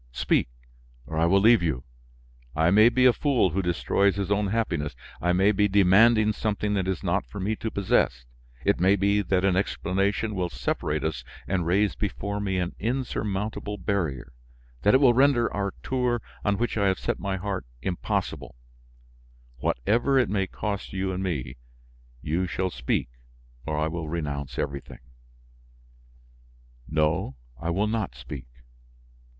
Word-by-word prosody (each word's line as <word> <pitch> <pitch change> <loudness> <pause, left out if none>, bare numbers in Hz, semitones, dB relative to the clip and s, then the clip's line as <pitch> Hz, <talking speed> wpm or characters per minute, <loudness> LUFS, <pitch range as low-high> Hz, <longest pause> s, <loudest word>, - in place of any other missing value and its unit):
Speak, - - +1 0.6
or 80 - -7
I 80 +1 +3
will 95 +3 +4
leave 115 0 +6
you. 75 -8 -1 0.7
I 80 +2 +3
may 110 +4 +7
be 125 +2 +2
a 125 - +7
fool 130 - +2
who 95 +5 0
destroys 95 +3 +1
his 100 0 -3
own 100 0 +2
happiness, 95 -9 -1 0.3
I 90 - +2
may 95 +3 +4
be 105 0 +2
demanding 105 +3 +5
something 105 0 -1
that 95 -2 0
is 95 -1 -2
not 95 +2 +1
for 100 - -8
me 105 +4 -1
to 115 - -3
possess, 90 - +1 0.4
it - - +2
may 95 +3 +4
be 100 +1 +2
that 95 -1 +1
an 95 -2 +3
explanation 100 +2 0
will 90 -3 -1
separate 75 -3 -2
us 75 -6 -2 0.2
and 90 -3 -1
raise 100 +4 +2
before 100 0 -3
me 95 -2 -1
an 90 -1 -2
insurmountable 105 -4 -2
barrier, 85 -11 -2 0.5
that 105 - +4
it - - +9
will 130 -4 +6
render 130 -2 +3
our 100 -1 -1
tour, 125 -2 0 0.2
on 100 -1 +1
which 120 0 -1
I 100 - +3
have 95 - +2
set - - -2
my 100 -1 -2
heart, 95 -7 -4 0.2
impossible; 90 -8 -3 1.0
whatever 115 - +1
it 130 - +3
may 95 -1 0
cost 100 +1 -4
you 95 0 -1
and 95 0 -3
me, 70 -9 -3 0.7
you 90 +5 0
shall 95 +3 -2
speak - - -1 0.6
or 80 -1 -1
I 75 +1 +1
will 80 -1 -4
renounce 70 -5 -4
everything." 70 0 -5 1.9
"No, 75 -1 0 0.2
I 85 - -3
will 95 +5 +1
not 110 - -2
speak." 65 0 -8
95 Hz, 160 wpm, -26 LUFS, 85-105 Hz, 1.9 s, it